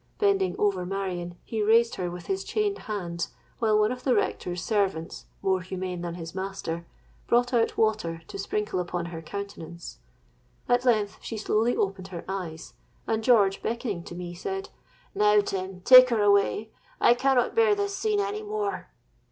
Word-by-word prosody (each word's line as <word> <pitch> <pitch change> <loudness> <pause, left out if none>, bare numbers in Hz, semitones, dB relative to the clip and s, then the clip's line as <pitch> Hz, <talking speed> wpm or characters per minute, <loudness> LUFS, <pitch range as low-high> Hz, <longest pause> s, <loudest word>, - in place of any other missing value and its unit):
Bending 395 -2 +2
over 195 -3 +1
Marion, 180 -2 -4
he 220 -2 -3
raised 230 +2 +4
her 180 -1 -3
with 175 -1 -8
his 195 +1 -2
chained 415 - -1
hands, 170 -5 -3 0.3
while 220 -2 +3
one 215 +1 +3
of 250 0 -6
the 255 - +3
rector's 175 -1 -1
servants, 195 -7 -1 0.2
more 190 -1 +2
humane 185 -1 -5
than 170 -1 -4
his 165 -1 -7
master, 190 -3 -4 0.4
brought 245 +2 +2
out 230 -2 +2
water 210 -7 0
to 195 - -7
sprinkle 210 -1 -2
upon 175 -1 -3
her 170 -1 -6
countenance. 170 -2 -8 0.7
At 245 +1 +2
length 215 -4 +2
she 225 - -5
slowly 220 +3 +1
opened 190 -1 -1
her 175 -3 -8
eyes; 180 -4 -5 0.3
and 220 0 -1
George, 205 -5 +4
beckoning 225 -6 -2
to 175 - -8
me, 175 0 -6
said, 385 - -5 0.4
'Now, 210 0 +4
Tim, 190 -2 -4
take 255 +4 +9
her 225 -3 +2
away: 205 +2 +2 0.3
I 235 - +6
cannot 255 0 +2
bear 450 -2 +4
this 405 0 -2
scene 420 +1 0
any 410 +1 -2
more!' 420 -1 -3
205 Hz, 170 wpm, -27 LUFS, 180-245 Hz, 0.7 s, take